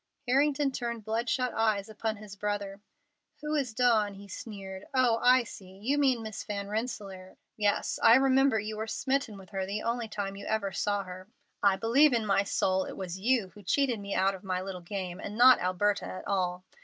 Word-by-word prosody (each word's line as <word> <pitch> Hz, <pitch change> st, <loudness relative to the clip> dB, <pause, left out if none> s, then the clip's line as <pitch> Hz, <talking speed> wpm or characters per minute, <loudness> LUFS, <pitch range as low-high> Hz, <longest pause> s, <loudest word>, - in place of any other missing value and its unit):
Harrington 280 Hz, +2 st, +2 dB
turned 235 Hz, -4 st, -4 dB
bloodshot 235 Hz, +3 st, 0 dB
eyes 215 Hz, -2 st, +1 dB
upon 220 Hz, 0 st, -3 dB
his 205 Hz, -1 st, -11 dB
brother. 205 Hz, -1 st, -3 dB, 0.6 s
"Who 300 Hz, 0 st, -3 dB
is 275 Hz, -6 st, 0 dB
Dawn?" 220 Hz, -4 st, +3 dB
he 200 Hz, +1 st, -12 dB
sneered. 195 Hz, -2 st, -8 dB
"Oh, 245 Hz, -3 st, +3 dB
I 250 Hz, 0 st, +5 dB
see! 190 Hz, -4 st, -12 dB
You 270 Hz, +8 st, 0 dB
mean 260 Hz, -5 st, +2 dB
Miss 215 Hz, -1 st, -6 dB
Van 200 Hz, -1 st, -4 dB
Rensselaer. 200 Hz, -4 st, -5 dB, 0.2 s
Yes, 205 Hz, -1 st, 0 dB
I 230 Hz, -, +8 dB
remember 270 Hz, -2 st, +4 dB
you 215 Hz, +1 st, -5 dB
were 220 Hz, +1 st, -3 dB
smitten 260 Hz, -3 st, -1 dB
with 190 Hz, -1 st, -13 dB
her 195 Hz, -1 st, -2 dB
the 205 Hz, +2 st, -3 dB
only 235 Hz, 0 st, -1 dB
time 200 Hz, -2 st, -4 dB
you 200 Hz, -, -8 dB
ever 215 Hz, -3 st, -1 dB
saw 205 Hz, +1 st, -1 dB
her. 185 Hz, 0 st, -10 dB, 0.3 s
I 200 Hz, -1 st, +4 dB
believe 255 Hz, +8 st, +4 dB
in 230 Hz, -2 st, +1 dB
my 200 Hz, -1 st, +3 dB
soul 190 Hz, -1 st, 0 dB
it -, -, -8 dB
was 185 Hz, -1 st, -5 dB
you 225 Hz, -2 st, +1 dB
who 195 Hz, +4 st, -15 dB
cheated 245 Hz, +3 st, +1 dB
me 200 Hz, 0 st, -4 dB
out 190 Hz, +1 st, +2 dB
of 190 Hz, +1 st, -10 dB
my 185 Hz, -2 st, -1 dB
little 185 Hz, -1 st, -6 dB
game, 180 Hz, 0 st, -5 dB
and 210 Hz, +1 st, -6 dB
not 250 Hz, +1 st, +8 dB
Alberta 200 Hz, +3 st, 0 dB
at 185 Hz, -, -7 dB
all. 180 Hz, -2 st, -1 dB
210 Hz, 200 wpm, -29 LUFS, 195-240 Hz, 0.6 s, I